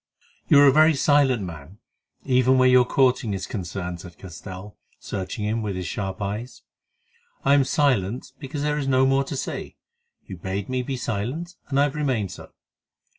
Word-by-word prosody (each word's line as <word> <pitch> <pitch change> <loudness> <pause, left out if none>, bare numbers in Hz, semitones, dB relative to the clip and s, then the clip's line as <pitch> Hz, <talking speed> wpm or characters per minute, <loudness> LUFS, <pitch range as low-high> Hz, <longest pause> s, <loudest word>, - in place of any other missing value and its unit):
"You 145 - +6
are - - +8
a 140 - +7
very 155 +2 +5
silent 135 -5 +3
man, 85 +1 -9 0.5
even 130 0 +3
where 130 0 +5
your 125 -1 +6
courting 125 -5 +2
is 95 - -4
concerned," 90 -4 -5
said 90 -2 -12
Castell, 95 +2 -10 0.2
searching 95 +2 -5
him 110 +2 -1
with 105 -3 -3
his 90 -1 -4
sharp 95 +3 -4
eyes. 105 +6 -5 0.8
"I 140 - +5
am 140 -1 +5
silent 130 -5 0
because 140 +1 -5
there 150 0 0
is 140 - -3
no 130 0 +4
more 135 +1 +3
to 135 - -5
say. - - -5 0.5
You 95 - -8
bade 95 +4 -4
me 130 0 0
be 130 +1 -4
silent, 125 - -3
and 140 -1 0
I - - +5
have 145 -2 0
remained 130 - -1
so." - - -11
125 Hz, 180 wpm, -24 LUFS, 95-135 Hz, 0.8 s, are